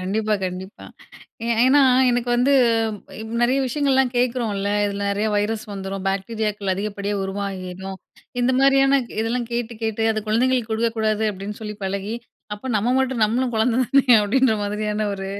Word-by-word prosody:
கண்டிப்பா, 210 +3 0
கண்டிப்பா. 185 +2 -6 0.6
ஏ - - -3 0.2
ஏன்னா 275 +3 +5 0.3
எனக்கு 245 0 -1
வந்து 250 +3 +3 0.9
நிறைய 255 +3 +3
விஷயங்கள்லாம் 265 -1 +1
கேட்குறோம்ல. 235 -5 0 0.2
இதில 200 0 -3
நிறையா 205 +2 0
வைரஸ் 210 +1 -1
வந்துரும். 195 -1 -5
பாக்டீரியாக்கள் 205 0 -2
அதிகப்படியா 200 +1 -3
உருவாகிரும். 190 -1 -5 0.4
இந்த 245 +1 +2
மாரியான 275 0 +4 0.2
இதெல்லாம் 235 +1 -2
கேட்டு, 235 0 -3
கேட்டு 225 0 -1
அது 215 - -2
குழந்தைங்களுக்கு 240 +1 +1
கொடுக்கக்கூடாது 220 -1 0
அப்பிடின்னு 200 +2 -7
சொல்லி 210 0 -5
பழகி 200 +3 -3 0.4
அப்ப 210 +5 -8
நம்ம 215 +2 +1
மட்டும் 265 -3 0
நம்மளும் 240 +4 +1
குழந்தை 225 +1 +1
தானே! 270 +2 +3 0.2
அப்பிடின்ற 235 +3 +2
மாதிரியான 210 +1 -2
ஒரு 195 -1 -5
220 Hz, 140 wpm, -22 LUFS, 200-245 Hz, 0.9 s, ஏன்னா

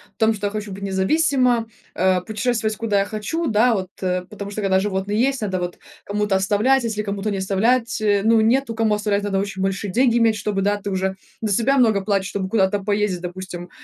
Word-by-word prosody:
в - - -56
том, 220 0 +4
что 205 0 -4
я 200 - -1
хочу 210 -1 -5
быть 195 +1 -7
независима, 240 +4 +2 0.3
э, 185 0 +2
путешествовать, 220 +1 -1
куда 210 -3 +1
я 195 - +1
хочу. 220 +11 -3
Да, 230 +2 +3
вот, 190 -3 -2
э, 185 -1 0
потому 200 -1 -7
что, 215 - -4
когда 190 -2 +2
животные 200 +1 -1
есть, 270 +1 +1
надо 190 -3 -1
вот, 175 0 -4
э, - - -37 0.3
кому-то 205 -1 0
оставлять, 210 +7 +2
если 220 -2 -2
кому-то 205 0 -3
не 195 - -2
оставлять, 225 +5 +1
э, 205 -2 +2
ну, 225 +1 +4
нету 230 +1 +1
кому 225 -2 +2
оставлять, 210 -1 0
надо 195 -1 0
очень 195 -1 -3
большие 195 +1 -2
деньги 240 +2 +3
иметь. 225 -1 +3
Чтобы, 205 -1 -2
да, 205 +1 +1
ты 200 0 -5
уже 190 0 -1 0.3
за 215 -2 -1
себя 255 +7 +2
много 220 -5 +3
платишь, 195 -1 0
чтобы 190 -2 -3
куда-то 195 -2 +2
поездить, 205 -3 0
допустим, 180 0 -7
205 Hz, 220 wpm, -21 LUFS, 195-225 Hz, 0.3 s, том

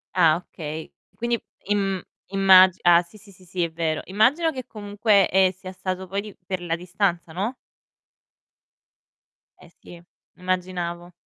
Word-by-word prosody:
Ah, 165 -4 +5
okay. 160 -3 -8 0.2
Quindi 235 -1 -1 0.2
im 195 -2 0 0.3
immagi 190 -1 +6
ah 175 0 +6
sì, 180 +5 -16
sì, 200 -1 -17
sì, 185 0 -19
sì, 180 0 -2
è 170 - -2
vero. 160 -1 -1
Immagino 265 - +2
che 255 -3 -7
comunque, 205 -1 +2
ehm, 190 0 +4
sia 185 0 -10
stato 185 0 -4
poi 195 +2 -2
di 210 -1 -11
per 185 -1 -3
la 170 -2 -1
distanza, 175 -1 -2
no? 205 +9 -2 2.1
Eh - - -16
sì, 170 -1 -13 0.4
immaginavo. 180 -1 -3
185 Hz, 145 wpm, -24 LUFS, 175-200 Hz, 2.1 s, immagi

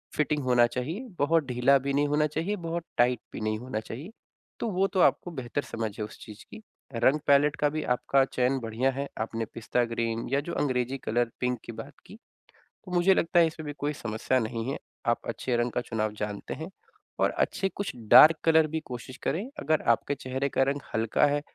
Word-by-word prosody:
Fitting 150 -1 0
होना 125 -2 +5
चाहिए, 150 - -4
बहुत 160 +3 +3
ढीला 125 +2 +4
भी 140 +1 -2
नहीं 145 +1 +2
होना 150 +1 +2
चाहिए, 165 +7 -2
बहुत 170 -2 -4
टाइट 120 0 +3
भी - - -6
नहीं 110 0 -1
होना 125 -2 -4
चाहिए। 125 - -8 0.5
तो - - -2
वो 190 +1 +2
तो 195 - -2
आपको 175 - +3
बेहतर 130 -2 -3
समझ 115 -1 -4
है 105 - -1
उस 105 - -12
चीज़ 105 -1 -11
की, - - -10 0.3
रंग-पैलेट 140 +4 +3
का 150 - +3
भी 155 +1 -3
आपका 135 +2 +2
चयन 130 0 0
बढ़िया 120 +3 0
है। 140 +2 -4
आपने 115 0 -2
पिस्ता 120 +1 0
ग्रीन 115 0 -2
या 140 - +4
जो 170 +4 -6
अंग्रेज़ी 130 -1 0
कलर 120 -1 0
पिंक 125 -1 -1
की - - -6
बात 140 +5 -9
की। - - -12 0.7
तो 185 - -9
मुझे 180 +2 +4
लगता 175 -1 +2
है 165 - +6
इसमें 160 -1 -7
भी 145 - -4
कोई 145 +1 -1
समस्या 120 +1 -1
नहीं 115 0 -3
है, - - -3 0.3
आप - - +2
अच्छे 125 - -2
रंग 120 +1 0
का 125 - -1
चुनाव 110 -2 -2
जानते 105 -1 -4
हैं 160 +3 -7 0.5
और - - +4
अच्छे 195 - 0
कुछ 200 - -3 0.2
डार्क 155 +1 +10
कलर 160 -1 +5
भी 160 +1 -2
कोशिश 125 +1 -8
करें, 175 +9 -1
अगर 155 - +1
आपके 145 +5 -3
चेहरे 130 +1 -3
का 135 - +2
रंग 140 +2 0
हल्का 110 +6 +2
है, 145 0 +1
135 Hz, 210 wpm, -28 LUFS, 120-155 Hz, 0.7 s, डार्क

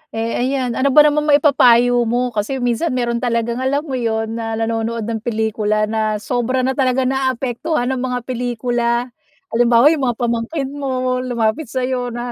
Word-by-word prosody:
Eh 225 +1 -2
ayan, 255 0 -1
ano 260 +4 0
ba 295 +2 +6
namang 300 0 +2
maipapayo 245 -5 +4
mo? 245 +2 0
Kasi 235 +4 -3
minsan, 245 +5 0
mayro'n 235 -1 -1
talagang 235 -1 -1
alam 275 +3 0
mo 305 - -8
'yon, 225 -2 -2
na 225 -1 -3
nanonood 225 0 -2
ng 225 +1 -3
pelikula 215 -2 -1
na 215 0 -1
sobra 245 +4 -1
na 260 - +1
talaga 260 -1 +1
naaapektuhan 260 +1 -1
ng 260 - -2
mga 250 -1 -2
pelikula. 240 0 -2 0.4
Halimbawa, 240 +4 +5
'yong 285 -5 0
mga 240 - 0
pamangkin 240 +5 -2
mo, 255 -3 -2
lumapit 245 +3 -1
sa'yo, 255 0 -2
na 240 0 -5
245 Hz, 165 wpm, -18 LUFS, 230-260 Hz, 0.4 s, ba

